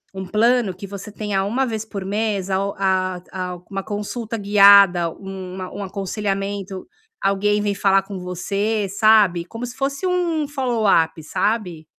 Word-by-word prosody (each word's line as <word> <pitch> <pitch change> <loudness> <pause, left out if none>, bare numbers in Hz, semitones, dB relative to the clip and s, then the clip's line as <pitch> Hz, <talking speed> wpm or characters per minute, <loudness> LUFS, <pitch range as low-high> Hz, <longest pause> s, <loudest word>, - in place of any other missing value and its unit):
um 190 0 -5
plano 220 0 +2
que 190 - -8
você 200 +2 -8
tenha 205 -2 -2
1 240 +7 0
vez 220 -3 -3
por 200 -3 -6
mês 205 -1 -1
a 190 0 +1
o 200 - -3
a 185 -2 0
a 180 -1 -4
uma 195 -1 -4
consulta 220 +3 -4
guiada, 200 -4 +6
uma 190 0 -7
um 205 - -6
aconselhamento, 195 0 -4 0.3
alguém 205 +1 +1
vem 205 -1 0
falar 195 -1 +3
com 195 -1 -7
você, 200 +4 -2
sabe, 205 -4 +4
como 230 +6 -6
se 245 - -9
fosse 275 +5 -2
um 340 -4 0
follow 255 -6 -1
up, 165 -3 +3
sabe. 185 -3 -2
200 Hz, 160 wpm, -21 LUFS, 190-220 Hz, 0.3 s, guiada